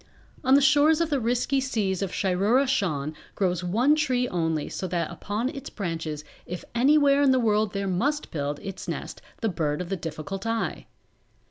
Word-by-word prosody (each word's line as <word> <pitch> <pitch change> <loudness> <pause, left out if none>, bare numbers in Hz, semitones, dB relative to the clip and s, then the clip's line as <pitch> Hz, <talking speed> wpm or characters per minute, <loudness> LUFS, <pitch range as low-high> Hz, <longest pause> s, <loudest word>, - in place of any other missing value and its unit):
On 260 +1 +5
the 280 - +6
shores 295 +3 +5
of 335 -2 0
the 285 - +2
risky 245 +3 +1
seas 205 -8 -1
of 195 -2 -2
Shiroora 205 +8 +2
Shan 155 - 0 0.2
grows 180 -3 0
one 230 +11 +3
tree 255 -5 +1
only 165 -6 -1
so 185 - -4
that 170 -2 -2
upon 215 +5 -3
its 275 -1 -7
branches 165 -6 -4 0.2
if 180 0 -6
anywhere 280 +3 +4
in 280 - +5
the 260 - +4
world 215 -3 +1
there 200 -1 -2
must 275 +12 -1
build 145 -1 -2
its 195 -1 -7
nest - - -5 0.2
the 225 - +1
Bird 150 -5 -1
of 180 -1 -5
the 195 - 0
Difficult 170 +5 -5
Eye. 225 0 -2
205 Hz, 185 wpm, -26 LUFS, 175-265 Hz, 0.2 s, the